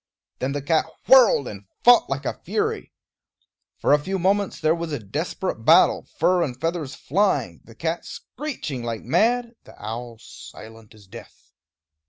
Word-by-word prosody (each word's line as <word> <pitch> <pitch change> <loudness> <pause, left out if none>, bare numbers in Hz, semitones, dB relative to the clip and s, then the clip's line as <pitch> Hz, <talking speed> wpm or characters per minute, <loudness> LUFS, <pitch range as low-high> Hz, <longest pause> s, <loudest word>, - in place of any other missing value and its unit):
Then 135 +2 -2
the 145 -1 -4
cat 160 +2 +1 0.2
whirled 250 - +6
and 100 -1 -9 0.2
fought 245 0 +6
like - - -3
a - - -1
fury. 435 0 -2 0.9
For - - +2
a 150 - +5
few 190 +6 -3
moments 195 +2 0
there 155 0 +2
was 170 -1 -4
a 145 - -2
desperate 105 -5 -4
battle, - - +4
fur 180 -1 +2
and 130 -7 -3
feathers 160 -3 -3
flying, 145 - 0
the 115 - -16
cat 165 +7 -3
screeching 250 - -6
like 115 -2 -4
mad, 235 - +1
the - - -17
owl 115 +2 -6
silent 110 0 -13
as 105 -2 -18
death. 115 +5 -14
155 Hz, 160 wpm, -23 LUFS, 115-195 Hz, 0.9 s, whirled